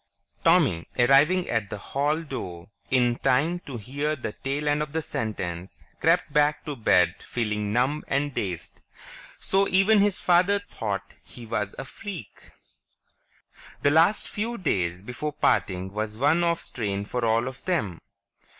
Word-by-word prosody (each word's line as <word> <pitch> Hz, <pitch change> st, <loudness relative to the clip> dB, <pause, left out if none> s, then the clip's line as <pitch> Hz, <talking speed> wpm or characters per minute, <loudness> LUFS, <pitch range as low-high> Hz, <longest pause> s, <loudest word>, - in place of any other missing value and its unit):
Tommy, 85 Hz, 0 st, +3 dB
arriving 145 Hz, +9 st, +4 dB
at 110 Hz, -4 st, -1 dB
the -, -, -5 dB
hall 145 Hz, +9 st, -1 dB
door 90 Hz, -, -7 dB, 0.2 s
in 120 Hz, -2 st, +2 dB
time 160 Hz, +8 st, +2 dB
to 135 Hz, -7 st, -8 dB
hear 145 Hz, +7 st, -2 dB
the 120 Hz, -6 st, -5 dB
tail 140 Hz, +6 st, -3 dB
end 145 Hz, 0 st, +2 dB
of 150 Hz, -1 st, -4 dB
the 160 Hz, -, 0 dB
sentence, 95 Hz, -, -4 dB
crept 165 Hz, -2 st, +2 dB
back 150 Hz, 0 st, +2 dB
to 150 Hz, -2 st, -4 dB
bed 90 Hz, -7 st, +3 dB
feeling 105 Hz, -3 st, -2 dB
numb 130 Hz, +7 st, +1 dB
and 140 Hz, +1 st, 0 dB
dazed. 90 Hz, -7 st, -4 dB, 0.6 s
So 195 Hz, +1 st, +2 dB
even 195 Hz, +3 st, +4 dB
his 200 Hz, -1 st, +3 dB
father 180 Hz, +3 st, +3 dB
thought 115 Hz, -, -5 dB
he 120 Hz, -, -12 dB
was 110 Hz, -3 st, -2 dB
a 135 Hz, -, -5 dB
freak. 170 Hz, -, -9 dB, 1.3 s
The 145 Hz, -, +4 dB
last 165 Hz, +7 st, +4 dB
few 230 Hz, +3 st, -3 dB
days 90 Hz, -, -1 dB
before 135 Hz, +6 st, -4 dB
parting 95 Hz, -9 st, 0 dB
was 105 Hz, 0 st, -3 dB
one 150 Hz, +7 st, +3 dB
of 170 Hz, 0 st, +1 dB
strain 100 Hz, -4 st, -3 dB
for 125 Hz, +3 st, -3 dB
all 115 Hz, +2 st, +2 dB
of 130 Hz, 0 st, -8 dB
them. 110 Hz, -, -1 dB
135 Hz, 150 wpm, -26 LUFS, 105-160 Hz, 1.3 s, arriving